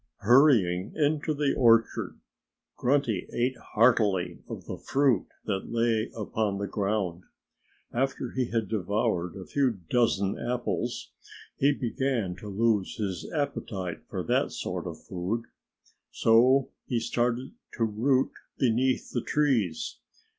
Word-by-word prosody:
Hurrying 105 - +4
into 155 0 +1
the 145 -2 +1
orchard, 115 -2 +3 0.6
Grunty 125 -6 +1
ate 125 +2 0 0.2
heartily 105 -5 +3
of - - -7
the - - -6
fruit 135 -7 +2 0.2
that 95 -3 -3
lay 115 -1 +1
upon 105 -1 -1
the 100 - -2
ground. 100 -4 -1 0.7
After 130 0 -1
he 130 -1 0
had 115 -2 -1
devoured 100 -3 -1
a 95 -2 -8
few 130 -6 +1
dozen 100 -5 +2
apples 120 +1 -2 0.4
he 140 +2 +3
began 125 -7 -1
to 105 - -9
lose 105 -1 +1
his 95 -5 -4
appetite 105 - -3
for - - -3
that - - +1
sort - - -4
of - - -8
food. 95 +6 -3 0.7
So 125 +4 +4 0.2
he 120 - 0
started 120 +2 -1 0.2
to 115 - -1
root 125 +5 +2 0.3
beneath 130 +1 +1
the 120 - -1
trees. 120 - 0
115 Hz, 125 wpm, -28 LUFS, 100-130 Hz, 0.7 s, Hurrying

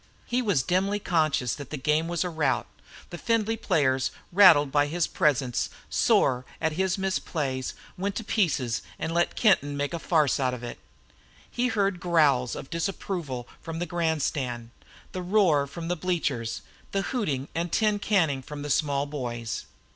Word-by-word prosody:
He 245 +1 0
was 200 - +1
dimly 190 +4 +1
conscious 155 - +1
that 145 -3 -8
the 150 - -4
game 150 +4 +1
was 170 -1 -1
a 180 - -2
rout; 160 -2 +1
that - - -20
the 175 - -5
Findlay 225 -1 +1
players, 135 - +1 0.2
rattled 170 -7 +7
by 145 0 +3
his 170 +3 0
presence, 135 -5 +1 0.2
sore 125 -2 +3 0.2
at 160 -1 +1
his 190 +4 0
misplays, 150 -9 -2 0.3
went 200 +1 -2
to 225 - -3
pieces 150 - 0 0.2
and 165 - -3
let 170 0 +1
Kenton 145 -10 +3
make 145 +3 -2
a 170 - -2
farce 155 -6 +2
out 130 -2 +1
of 120 - -10
it. 120 - -6 0.7
He 245 +1 0
heard 205 -4 +1
the 175 - -12
growls 150 -8 +3
of - - -8
disapproval 165 -7 -3
from 165 -1 -6
the 175 - -2
grandstand, 145 -9 -1 0.4
the 185 - -4
roar 175 -7 +3
from 165 +3 -7
the 175 - 0
bleachers 150 -10 -2 0.3
the 195 0 +1
hooting 150 - -2
and 170 0 -2
tin 210 -2 +2
canning 165 -10 +1
from 145 +2 -8
the 145 - -3
small 140 -1 +1
boys. 120 -5 -4
160 Hz, 170 wpm, -27 LUFS, 140-185 Hz, 0.7 s, rattled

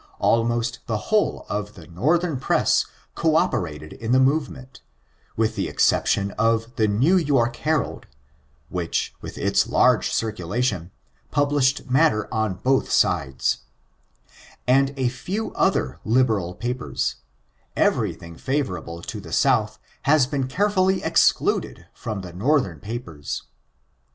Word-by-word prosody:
Almost 115 0 +1
the 110 - 0 0.2
whole 215 - +2
of 105 0 -4
the 85 - -12
Northern 150 - 0
press - - +2 0.3
co - - +1
operated 75 +1 -1
in 115 +2 -2
the 130 - +5
movement, 135 -1 -1 0.6
with 110 0 +1
the - - -1
exception 100 0 +2
t»f 115 +3 0
the 110 -4 +2
New 130 - +3
York 135 -8 +1
Herald, 155 0 -1 0.6
(which, 90 -2 -2
with - - -8
its - - +2
large - - +3
circulation, 105 -2 -1 0.4
published 145 -2 +1
matter 130 -4 +3
on 110 -4 0
both 130 +7 +1
sides,) 65 -1 +1 1.1
and 135 +2 +3
a 130 -2 +1
few 185 - -4
other 65 +5 0
liberal 110 -7 +1
papers, 125 +1 -3 0.6
everything 85 -1 0
favorable 90 - -3
to 105 - -6
the 85 -4 -11
South 110 -2 +2 0.3
has 150 -3 +6
been 135 -1 -2
carefully 190 +4 +1
excluded - - +2
from 110 -5 -5
the 90 -2 -9
Northern 100 - +1
papers. 85 - -6
120 Hz, 120 wpm, -23 LUFS, 100-135 Hz, 1.1 s, has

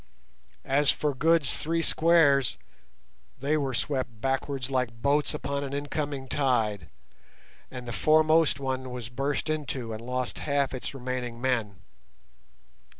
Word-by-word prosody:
As 140 +1 +3
for 150 -1 +1
Good's 160 0 +2
three 165 +1 -1
squares, 155 -6 +4 0.8
they 140 +4 +1
were 135 -4 -1
swept 130 -3 -2
backwards 135 +1 -2
like 125 -3 -1
boats 145 +4 +1
upon 140 0 -3
an 140 -1 -5
incoming 145 -1 -3
tide, 115 - 0 0.8
and 125 -1 -8
the 120 - -4
foremost 155 +4 +4
one 130 -1 -3
was 125 -2 -6
burst 135 +5 -2
into 135 -7 -3
and 110 - -6
lost 125 0 -3
half 140 -2 0
its 130 +2 -5
remaining 125 -2 -4
men. 115 -7 -1
135 Hz, 130 wpm, -28 LUFS, 125-145 Hz, 0.8 s, squares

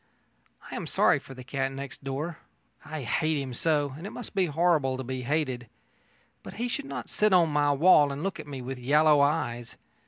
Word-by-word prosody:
I - - -5
am - - -4
sorry - - +3
for 135 - -12
the 130 - -9
cat 135 +1 -2
next 135 0 -7
door. 145 +5 -4 0.4
I 155 -3 -6
hate 155 +5 0
him 135 -2 -5
so, 145 0 0
and 165 +7 -7
it - - -5
must 240 - -8
be 190 -2 +2
horrible 155 -4 +2
to 130 - -4
be 130 +1 -4
hated. 130 -3 -1 0.7
But - - -10
he 240 +3 -2
should 280 +3 -3
not - - -6
sit 210 -2 +2
on 170 -3 +5
my 145 -1 +2
wall 145 -1 +5
and 140 +3 -5
look 195 -3 -3
at 155 - -8
me 135 -3 -6
with 130 +1 -5
yellow 150 +3 +4
eyes. 120 -6 -1
145 Hz, 210 wpm, -28 LUFS, 135-160 Hz, 0.7 s, on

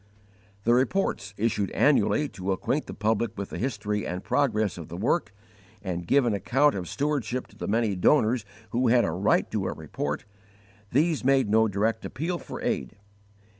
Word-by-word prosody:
The 115 - +4
reports, 125 - 0
issued 105 -3 0
annually 150 +1 +3
to 95 -3 -4
acquaint 135 +10 -1
the - - -6
public 110 0 0
with 100 0 -5
the - - -5
history 105 -5 -2
and 90 +2 -4
progress 110 -10 +1
of 80 - -8
the 85 - -7
work, 110 - 0 0.5
and 90 -3 -4
give 140 -2 +4
an 115 - +1
account 135 +9 +2
of 90 -3 -4
stewardship 140 -4 -1
to - - -19
the - - -5
many 110 -1 +1
donors 115 +3 +3 0.3
who 125 +2 +1
had 120 +1 +4
a - - -1
right 90 +5 +2
to - - -1
a - - -2
report 75 +1 -4 0.7
these 155 +3 +2
made 135 -4 +3
_no 110 0 +4
direct 105 +3 0
appeal 170 +4 -3
for - - -8
aid. 65 - -2
110 Hz, 175 wpm, -27 LUFS, 100-135 Hz, 0.7 s, The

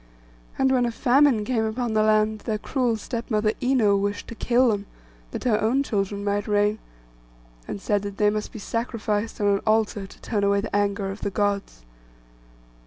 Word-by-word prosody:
And 265 0 +3
when 250 -2 +3
a - - -2
famine 255 -2 +3
came 230 -1 0
upon 225 +1 -2
the 215 - +3
land, 215 0 +2
their 215 0 -2
cruel 240 0 0
step 230 +2 -5
mother 215 -1 +2
Ino 245 -6 +3
wished 200 +1 -2
to - - -6
kill 245 +2 +2
them, 205 -2 -2 0.4
that - - -6
her 225 -4 +2
own 245 +6 +2
children 200 -4 -2
might 205 0 -1
reign, 210 +1 +2 0.9
and - - -5
said 205 0 0
that 200 -1 -6
they 210 -1 +3
must 210 0 -3
be - - -9
sacrificed 220 -1 -2
on 205 - 0
an 200 -1 +3
altar, 215 -2 +1
to - - -17
turn 210 -3 -1
away 200 0 +3
the 205 - -4
anger 200 -1 0
of 195 - -9
the 200 - -1
Gods. 200 - -2
215 Hz, 190 wpm, -24 LUFS, 205-230 Hz, 0.9 s, And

